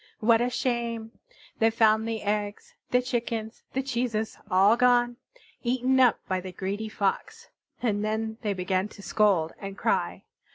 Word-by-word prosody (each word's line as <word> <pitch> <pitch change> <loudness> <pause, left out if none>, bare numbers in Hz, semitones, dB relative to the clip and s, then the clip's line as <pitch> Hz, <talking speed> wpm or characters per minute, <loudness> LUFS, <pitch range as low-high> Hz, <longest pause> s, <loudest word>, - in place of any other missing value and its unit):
What 225 +1 +4
a 245 - +1
shame! 235 -2 -2 0.5
they 225 - +5
found 220 -1 +3
the 225 -2 -3
eggs, 205 0 -2 0.2
the 250 0 +2
chickens, 230 -2 -3
the 265 - 0
cheeses 235 -4 -2
all 195 +3 +5
gone 245 -1 +3 0.4
eaten 255 +2 +1
up 250 -4 +5
by 185 -1 -1
the 185 0 -7
greedy 200 +4 -4
Fox. 445 - -2 0.3
And 210 -3 +1
then 220 +1 -2
they 210 -3 -1
began 185 +1 -1
to 205 -1 -14
scold 195 -8 +2
and 195 0 -7
cry. - - 0
220 Hz, 155 wpm, -27 LUFS, 205-240 Hz, 0.5 s, they